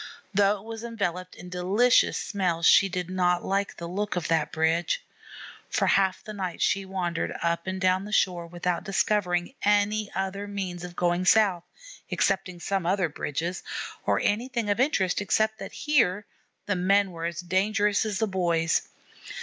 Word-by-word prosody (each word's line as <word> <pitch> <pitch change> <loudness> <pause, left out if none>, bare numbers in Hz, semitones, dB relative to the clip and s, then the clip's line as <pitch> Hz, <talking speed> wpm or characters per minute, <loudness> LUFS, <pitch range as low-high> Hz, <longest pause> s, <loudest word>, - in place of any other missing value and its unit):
Though 200 +1 +3
it 195 - -14
was 225 0 -7
enveloped 185 -6 -3
in 180 - -10
delicious 195 +7 +3
smells, 175 -5 -1
she 195 - +6
did 180 -1 -3
not 180 -1 +1
like 200 +1 -1
the 170 - -6
look 200 +4 -2
of 175 -3 -2
that 160 -2 +1
bridge. 160 +1 0 0.6
For - - +1
half 190 -1 +2
the 215 - -8
night 185 -4 -4
she 195 0 +1
wandered 180 -3 -2
up 170 +1 -1
and 185 0 -3
down 185 +1 +2
the 210 - -8
shore 175 -5 +1
without 175 +1 -2
discovering 190 -1 0
any 205 +1 +2
other 195 +1 -3
means 190 -3 -4
of 175 0 -8
going 175 +1 +1
south, 190 -4 +4 0.4
excepting 185 -2 0
some 190 -1 -2
other 185 -2 +1
bridges, 160 +5 -3 0.4
or - - +1
anything 235 0 0
of 205 - 0
interest 205 -10 +1
except 220 +2 +1
that - - -7
here 210 -10 +2 0.4
the 200 - 0
men 195 +2 +2
were 165 -1 -5
as 170 0 -3
dangerous 200 +3 +1
as 215 -3 -2
the 220 - +1
boys. 170 -4 0
190 Hz, 165 wpm, -26 LUFS, 175-205 Hz, 0.6 s, she